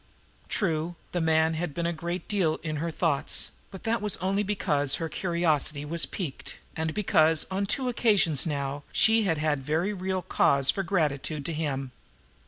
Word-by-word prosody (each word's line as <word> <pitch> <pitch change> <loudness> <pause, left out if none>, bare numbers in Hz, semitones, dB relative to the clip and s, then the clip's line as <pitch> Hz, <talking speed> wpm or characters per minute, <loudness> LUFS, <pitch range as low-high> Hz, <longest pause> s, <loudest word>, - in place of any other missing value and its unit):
True, 170 -4 -1 0.2
the 175 - -1
man 160 0 +3
had 160 -2 -3
been 170 - -2
a 170 - 0
great 170 +2 -5
deal 185 -7 +1
in 155 -2 -3
her 165 +3 -2
thoughts, 155 -3 +1 0.2
but 190 - -11
that 230 0 0
was 210 -1 0
only 195 +2 0
because 145 -9 +1
her 165 - -3
curiosity 155 -4 0
was 165 +2 +1
piqued, 165 -9 -6 0.2
and 160 0 -1
because 165 -6 +3
on 195 +1 -1
two 260 +4 0
occasions 205 - +3
now 140 -2 -3
she 220 -1 +4
had 165 -4 +1
had 150 -2 0
very 160 +8 0
real 185 -1 -2
cause 140 -4 +3
for 195 - -2
gratitude 155 -5 -1
to 165 - -2
him. 135 -4 -3
165 Hz, 175 wpm, -27 LUFS, 150-190 Hz, 0.2 s, she